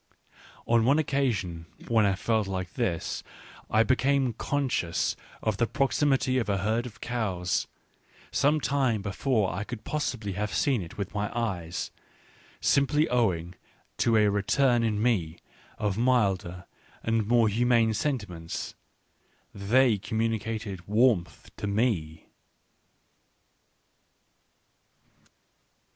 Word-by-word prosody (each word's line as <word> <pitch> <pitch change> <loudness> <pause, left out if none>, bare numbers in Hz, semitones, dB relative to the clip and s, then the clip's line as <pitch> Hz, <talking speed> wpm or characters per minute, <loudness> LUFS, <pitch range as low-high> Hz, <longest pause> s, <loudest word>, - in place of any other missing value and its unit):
On 115 -1 +3
one 135 +6 +4
occasion 110 - -1 0.2
when 110 -3 +3
I 100 - +1
felt 110 +1 0
like 95 -2 -4
this 95 -10 -2 0.5
I 110 +1 +4
became 130 +1 +2
conscious 130 -14 -1 0.3
of 110 -3 0
the 120 - +2
proximity 135 +2 +1
of 115 - -2
a 100 - +1
herd 110 +5 0
of 110 - -13
cows, 95 -7 -1 0.6
some 150 +2 +3
time 135 -8 0
before 105 0 0
I 100 +4 -3
could 110 0 -7
possibly 125 -9 -2
have 105 +3 -3
seen 130 -7 +2
it 85 - -9
with 100 -2 -4
my 105 +1 -1
eyes, 90 -8 -3 0.7
simply 145 +3 +3
owing 90 -8 +1 0.4
to 115 -1 +3
a 105 -1 +5
return 120 +5 +2
in 110 -2 0
me 95 -8 0 0.4
of 105 0 -1
milder 95 -7 +1 0.4
and 115 -2 0
more 120 -1 +4
humane 115 +1 +3
sentiments: 100 - -3 0.8
they 110 +3 +3
communicated 110 -3 -3
warmth 105 -7 +1
to 105 - -3
me. 100 -8 -1
110 Hz, 115 wpm, -27 LUFS, 95-125 Hz, 0.8 s, a